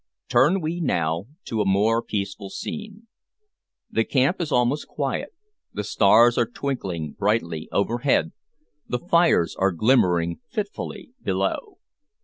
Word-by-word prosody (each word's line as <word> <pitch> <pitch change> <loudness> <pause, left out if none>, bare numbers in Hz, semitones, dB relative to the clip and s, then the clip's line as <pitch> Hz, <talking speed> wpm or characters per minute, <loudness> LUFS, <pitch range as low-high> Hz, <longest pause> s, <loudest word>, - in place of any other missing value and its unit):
Turn 175 +8 +4
we 165 +2 -2
now 85 - 0 0.2
to 110 -2 -1
a - - +3
more 105 +4 +2
peaceful 100 -2 -4
scene. 215 - -7 0.9
The 115 - +2
camp 135 +9 +1
is 160 -3 -3
almost 125 +4 +1
quiet, 145 - -3 0.4
the 105 - -3
stars 115 +4 +5
are 120 - +2
twinkling 95 - -4
brightly 95 -7 -1
overhead, 120 - +1 0.6
the 125 - -1
fires 170 - +2
are 95 +1 +3
glimmering 85 -5 +2
fitfully 210 +3 -5
below. 415 - -2
120 Hz, 125 wpm, -24 LUFS, 100-155 Hz, 0.9 s, stars